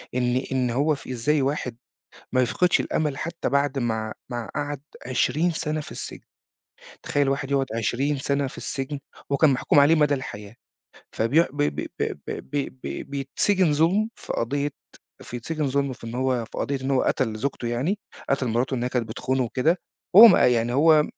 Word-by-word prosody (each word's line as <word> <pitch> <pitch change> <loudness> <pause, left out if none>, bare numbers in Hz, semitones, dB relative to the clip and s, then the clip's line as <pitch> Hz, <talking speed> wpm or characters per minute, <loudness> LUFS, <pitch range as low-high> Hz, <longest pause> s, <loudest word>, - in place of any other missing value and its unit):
إن 125 0 +1 0.2
إن 130 -2 +1
هو 145 +5 +2
ف - - -13
إزّاي 135 +4 +1
واحد 130 -4 -2 0.5
ما 130 - +3
يفقِدش 175 +9 +2
الأمل 150 -3 -1
حتى 170 +2 -3
بعد 140 0 +1
ما 110 -3 -2 0.2
ما 120 -2 -4
قعَد 145 -2 -3 0.3
20 155 +7 +1
سَنَة 155 -1 -2
في - - -11
السجن. - - -8 0.8
تخيّل 145 -1 +1
واحد 135 0 -1
يقعُد 135 -1 +2
20 135 +6 0
سَنَة 140 +1 0
في 130 - -9
السجن 135 +2 -4 0.3
وهو 140 - +2
كان 155 -3 +6
محكوم 135 +2 +2
عليه 150 +4 +6
مدى 150 -2 +3
الحياة. 105 -5 -7 0.6
فبي 120 +9 +3
ب 145 - -7
ب 145 0 0
ب - - -1
ب - - -6
ب 140 -2 -3
ب - - -6
بيتسجِن 150 +5 +1
ظُلم 180 +9 +2
في - - -6
قضيّة 140 +5 -1 0.5
فيتسجِن 145 +5 -3
ظُلم 140 0 0
في 120 - -11
إن 115 - -6
هو، 130 -2 0
في - - -9
قضيّة 140 -1 -1
إن 130 - -3
هو 135 -2 +3
قتَل 115 -4 0
زوجته 125 -1 -2
يعني، 135 - -1 0.3
قتَل 135 -1 +1
مِراته 120 +4 0
إن 120 - -2
هي 125 - 0
كانت 120 -3 -1
بتخونه 130 +3 -1
وكده، 140 +9 +1 0.4
وهو 220 +4 +12
ما 205 - +6
يعني 120 -1 +2
هو 150 +2 +5
135 Hz, 185 wpm, -25 LUFS, 125-150 Hz, 0.8 s, وهو